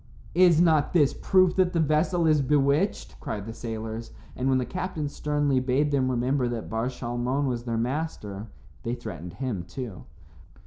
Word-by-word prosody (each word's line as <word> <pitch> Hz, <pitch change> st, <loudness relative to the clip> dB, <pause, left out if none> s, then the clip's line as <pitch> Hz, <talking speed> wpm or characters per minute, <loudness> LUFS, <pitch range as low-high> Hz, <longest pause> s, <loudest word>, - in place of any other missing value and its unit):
"Is 175 Hz, -2 st, +5 dB
not 160 Hz, -3 st, +3 dB
this 150 Hz, -6 st, +4 dB
proof 185 Hz, -2 st, +3 dB
that 185 Hz, -1 st, +3 dB
the 170 Hz, -, +1 dB
vessel 160 Hz, +3 st, +2 dB
is 155 Hz, -2 st, +4 dB
bewitched?" 145 Hz, +6 st, +1 dB
cried 105 Hz, -9 st, -5 dB
the 115 Hz, -, -6 dB
sailors, 115 Hz, 0 st, -6 dB, 0.2 s
and 130 Hz, +1 st, 0 dB
when 130 Hz, -, +3 dB
the 125 Hz, -, 0 dB
captain 160 Hz, +2 st, -3 dB
sternly 145 Hz, -2 st, 0 dB
bade 135 Hz, +3 st, +1 dB
them 130 Hz, -2 st, +2 dB
remember 125 Hz, +1 st, +1 dB
that 120 Hz, -2 st, -5 dB
Bar 115 Hz, +2 st, 0 dB
Shalmon 125 Hz, +2 st, -2 dB
was 120 Hz, -2 st, -2 dB
their 115 Hz, -2 st, -1 dB
master, 115 Hz, -5 st, -3 dB, 0.3 s
they 120 Hz, +1 st, -2 dB
threatened 90 Hz, -8 st, -7 dB
him 125 Hz, -9 st, -3 dB
too. 95 Hz, +2 st, -7 dB
130 Hz, 170 wpm, -26 LUFS, 120-150 Hz, 0.3 s, Is